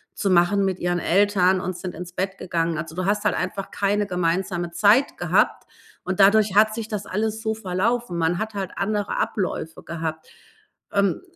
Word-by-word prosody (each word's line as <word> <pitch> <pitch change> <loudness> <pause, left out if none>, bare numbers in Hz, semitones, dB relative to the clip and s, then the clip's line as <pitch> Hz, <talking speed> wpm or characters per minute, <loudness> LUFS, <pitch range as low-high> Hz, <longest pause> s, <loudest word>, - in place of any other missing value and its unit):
zu 195 - -1
machen 185 +3 +3
mit 190 -1 -1
ihren 175 0 0
Eltern 190 0 +3
und 185 0 -3
sind 185 -2 -6
ins 175 +1 -8
Bett 190 +1 -3
gegangen. 165 -2 -1
Also, 160 0 -5
du 185 +1 -2
hast 205 +1 +1
halt 210 - +3
einfach 195 +2 -4
keine 205 +1 0
gemeinsame 175 0 -1
Zeit 215 +9 +3
gehabt, - - +1 0.4
und 185 +1 -3
dadurch 205 0 +5
hat 215 +1 +5
sich 225 -1 -4
das 205 -2 -4
alles 220 +2 -2
so 220 -1 -1
verlaufen. 210 0 -1
Man 165 +1 +1
hat 220 0 -3
halt 195 -2 -3
andere 205 0 -1
Abläufe 180 -5 -2
gehabt. 160 -1 -5 0.7
Ähm, 200 -2 +1
190 Hz, 180 wpm, -23 LUFS, 175-210 Hz, 0.7 s, dadurch